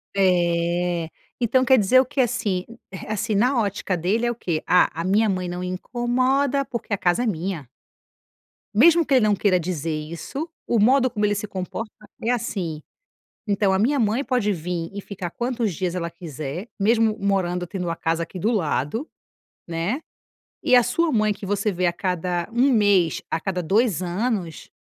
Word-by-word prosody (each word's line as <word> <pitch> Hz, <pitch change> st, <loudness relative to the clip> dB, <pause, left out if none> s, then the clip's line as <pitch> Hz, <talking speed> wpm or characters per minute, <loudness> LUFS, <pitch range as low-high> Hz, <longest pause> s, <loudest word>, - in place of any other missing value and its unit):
É. 175 Hz, -2 st, +1 dB, 0.3 s
Então 255 Hz, +2 st, +3 dB
quer 260 Hz, 0 st, +6 dB
dizer, 230 Hz, +6 st, +5 dB
o 265 Hz, -, -2 dB
que, 285 Hz, +2 st, -6 dB
assim, 225 Hz, -7 st, -1 dB, 0.3 s
eh, 185 Hz, -, -8 dB
assim 215 Hz, +1 st, -1 dB
na 245 Hz, +5 st, +3 dB
ótica 200 Hz, -3 st, -1 dB
dele 205 Hz, +8 st, 0 dB
é 240 Hz, -, +1 dB
o -, -, -5 dB
quê? 170 Hz, -8 st, -2 dB
"Ah, 180 Hz, -, +5 dB
a 165 Hz, -, -4 dB
minha 210 Hz, +3 st, +3 dB
mãe 185 Hz, -2 st, -1 dB
não 180 Hz, +1 st, -4 dB
incomoda 255 Hz, +8 st, 0 dB
porque 235 Hz, -4 st, -5 dB
a -, -, +2 dB
casa 180 Hz, +7 st, +1 dB
é -, -, -1 dB
minha". 170 Hz, -, -3 dB, 1.1 s
Mesmo 330 Hz, +9 st, +6 dB
que 280 Hz, -, 0 dB
ele 245 Hz, -4 st, +4 dB
não 205 Hz, -, +3 dB
queira 185 Hz, -2 st, +2 dB
dizer 165 Hz, -2 st, -3 dB
isso, 170 Hz, -, -5 dB, 0.2 s
o 235 Hz, -, +1 dB
modo 255 Hz, +4 st, +4 dB
como 210 Hz, -3 st, -1 dB
ele 205 Hz, -, +1 dB
se 205 Hz, +1 st, -4 dB
comporta 200 Hz, +3 st, -5 dB, 0.3 s
é 230 Hz, -, +1 dB
assim. 195 Hz, -10 st, -2 dB, 0.7 s
Então, 200 Hz, -1 st, +2 dB
"A 190 Hz, -, +2 dB
minha 260 Hz, +6 st, +2 dB
mãe 225 Hz, +5 st, +1 dB
pode 240 Hz, -5 st, +1 dB
vim 170 Hz, -1 st, -4 dB
e 200 Hz, -, -5 dB
ficar 190 Hz, -3 st, -6 dB
quantos 240 Hz, -1 st, -2 dB
dias 180 Hz, +1 st, -2 dB
ela 170 Hz, -2 st, -3 dB
quiser, 165 Hz, -, -6 dB
mesmo 220 Hz, +1 st, +3 dB
morando, 180 Hz, -3 st, 0 dB
tendo 180 Hz, -2 st, -4 dB
a 165 Hz, -, -2 dB
casa 165 Hz, +1 st, -1 dB
aqui 170 Hz, +3 st, -7 dB
do 215 Hz, +6 st, +1 dB
lado, 190 Hz, -, -1 dB, 0.6 s
né, 170 Hz, -, -2 dB, 0.6 s
e 255 Hz, -, +4 dB
a 245 Hz, -, +7 dB
sua 335 Hz, +6 st, +1 dB
mãe, 215 Hz, -4 st, +2 dB
que 200 Hz, -, -9 dB
você 205 Hz, +2 st, 0 dB
vê 185 Hz, -1 st, -1 dB
a 170 Hz, -, 0 dB
cada 180 Hz, -1 st, -2 dB
1 245 Hz, +4 st, +3 dB
mês, 200 Hz, -6 st, +3 dB
a -, -, 0 dB
cada 180 Hz, +1 st, -3 dB
2 200 Hz, +2 st, +2 dB
anos", 180 Hz, -2 st, -2 dB
200 Hz, 185 wpm, -23 LUFS, 175-235 Hz, 1.1 s, a